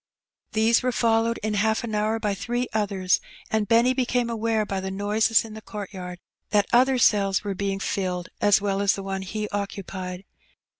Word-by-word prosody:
These 225 +2 +3
were 255 0 0
fol 225 -1 +2
lowed 230 0 -1
in 215 0 -1
half 220 +2 +1
an 230 -2 -4
hour 215 +1 0
by 210 -2 0
three 240 +5 -2
others, 195 -3 +1 0.3
and 220 -1 +1
Benny 235 +4 +4
became 245 -2 0
aware 225 -1 0
by 195 -1 -3
the 190 0 -4
noises 210 +4 +2
in 220 - -9
the 220 - -8
court 210 -2 -7
yard 180 -1 -7 0.3
that 205 -1 +3
other 255 +2 +5
cells 200 -5 +3
were 200 -1 -2
being 195 0 -2
filled 180 -3 -2
as 205 0 +5
well 200 -1 -1
as 200 -1 +3
the 195 - -5
one 195 0 -3
he 210 +3 -4
occupied. 195 -2 -5
210 Hz, 195 wpm, -25 LUFS, 195-225 Hz, 0.3 s, other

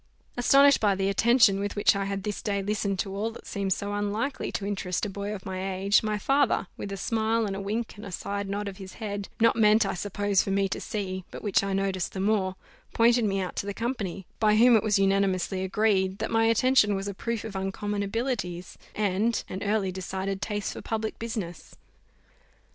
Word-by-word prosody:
Astonished 275 +3 +5
by 205 -2 +3
the 195 +1 0
attention 225 -1 +4
with 205 0 -3
which 205 +1 +4
I 195 0 -1
had 195 -1 -3
this 210 0 -3
day 200 -2 -1
listened 200 -1 -1
to 195 +1 -3
all 210 +3 -1
that 230 - -12
seemed 195 -2 -3
so 200 +2 -1
unlikely 205 +6 -2
to 200 - -3
interest 195 -2 -2
a 205 - -4
boy 200 +1 -4
of 200 -3 -6
my 190 0 -3
age, 195 +2 +3
my 215 -1 -1
father, 275 0 +2
with 200 - -6
a 195 - -4
smile 225 +2 0
and 195 -2 -3
a 195 - -4
wink, 220 +3 -3
and 205 - -9
a - - -8
side 200 +2 -4
nod 205 +1 -3
of 195 -1 -6
his 190 -2 -9
head, 205 -3 -5
not 230 0 +4
meant, 215 -1 +5
I - - -1
suppose, 205 +1 0
for - - -4
me 195 0 +2
to - - -4
see, 190 -3 -4
but - - -9
which 205 -2 +2
I 195 0 -1
noticed 190 -1 -1
the 190 - -4
more, 195 -2 +1 0.4
pointed 235 0 +4
me 195 -1 0
out 185 - -4
to 200 - -2
the 200 - -4
company, 205 -6 -3
by 215 -2 +4
whom 240 +2 +6
it 220 - +4
was 210 -1 +2
unanimously 195 -1 +1
agreed, 190 -1 +1
that - - -3
my 225 0 +3
attention 230 -2 +4
was 195 +1 -3
a 200 - -3
proof 230 +3 -3
of 220 -3 -7
uncommon 200 +2 -2
abilities, 200 -5 -3 0.2
and 210 +2 +1
an 190 - -5
early 205 -2 0
decided 190 +1 -4
taste 205 -2 -2
for - - -8
public 220 -1 -3
business. 210 -8 -6
200 Hz, 215 wpm, -27 LUFS, 195-220 Hz, 0.4 s, whom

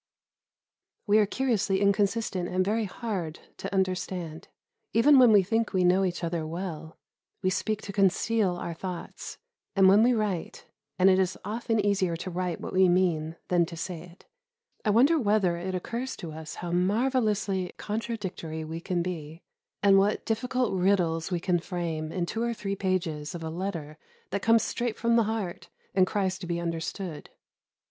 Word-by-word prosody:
We 210 0 +5
are 210 - +3
curiously 215 -6 +1
inconsistent 200 -2 +1
and 185 0 +1
very 220 +2 +1
hard 185 -6 -4 0.2
to - - -5
understand; 185 -4 -2 0.5
even 265 +5 +6
when 245 -3 +7
we 205 -2 +6
think 225 +4 0
we 185 -1 +2
know 180 +2 +4
each 180 -1 -2
other 170 -1 -1
well, 160 -1 -6 0.5
we 185 - +2
speak 215 +3 -1
to 200 - -6
conceal 195 0 +2
our 170 -1 -4
thoughts; 180 +1 -7 0.4
and, 195 -1 +6
when 200 +3 +7
we 245 +2 +5
write 205 -6 -2 0.3
(and 185 +1 +5
it 190 0 +5
is 190 -1 0
often 225 +1 -1
easier 200 -4 +1
to 185 +3 -5
write 180 -1 -2
what - - -6
we 185 -1 +5
mean 170 -3 +1
than 175 -1 +4
to 170 - -8
say 170 0 -5
it) 175 +1 -15 0.6
I - - +1
wonder 270 +10 +5
whether 205 -7 +2
it 185 +2 -3
occurs 235 +8 -4
to 165 - -7
us 155 0 -8
how 175 -1 -5
marvellously 205 -1 +1
contradictory 205 -8 -4
we 160 +1 -6
can 175 -1 -1
be, 165 -2 -6 0.4
and 195 -1 +7
what 205 +2 +1
difficult 245 +1 0
riddles 180 -4 +1
we 175 -2 -1
can 175 0 +1
frame, 165 -3 -3
in 175 0 -1
two 225 +6 -3
or 235 0 0
three 200 -2 -3
pages 175 -6 -2
of 165 - -6
a 160 - -4
letter 165 -4 -5 0.3
that 200 +1 -1
comes 225 +1 +4
straight 240 -2 -2
from 235 0 +2
the 230 -2 +4
heart 210 -5 -4 0.2
and 185 -1 +4
cries 190 -2 -1
to 180 - -7
be 170 0 -1
understood. 165 0 -4
185 Hz, 175 wpm, -28 LUFS, 170-210 Hz, 0.6 s, when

